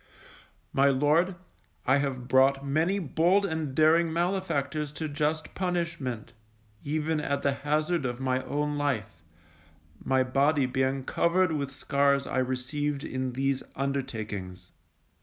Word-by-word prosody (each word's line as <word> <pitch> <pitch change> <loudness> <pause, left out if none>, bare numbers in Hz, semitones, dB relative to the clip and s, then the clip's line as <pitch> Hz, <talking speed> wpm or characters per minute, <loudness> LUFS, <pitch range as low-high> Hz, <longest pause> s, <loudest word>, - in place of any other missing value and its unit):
My 140 +1 +4
Lord, 150 +7 +3 0.5
I 130 +2 +4
have 135 -3 -2
brought 135 +1 +4
many 160 +8 +1
bold 180 +3 +2
and 160 -6 -3
daring 160 +2 +4
malefactors 165 -5 -1
to 155 +1 -4
just 150 +2 -2
punishment, 170 - -3 0.5
even 155 +1 -1
at 140 -1 -2
the 140 - +3
hazard 150 +4 0
of 120 -1 -3
my 130 -1 0
own 145 +2 -1
life, 110 - -2 0.8
my 130 -1 +2
body 140 +2 +2
being 130 +1 0
covered 170 +5 +2
with 140 -3 -2
scars 140 0 +1
I - - -1
received 135 +3 -2
in 130 -4 -3
these 135 +1 0
undertakings. 110 -9 -4
140 Hz, 125 wpm, -28 LUFS, 130-155 Hz, 0.8 s, My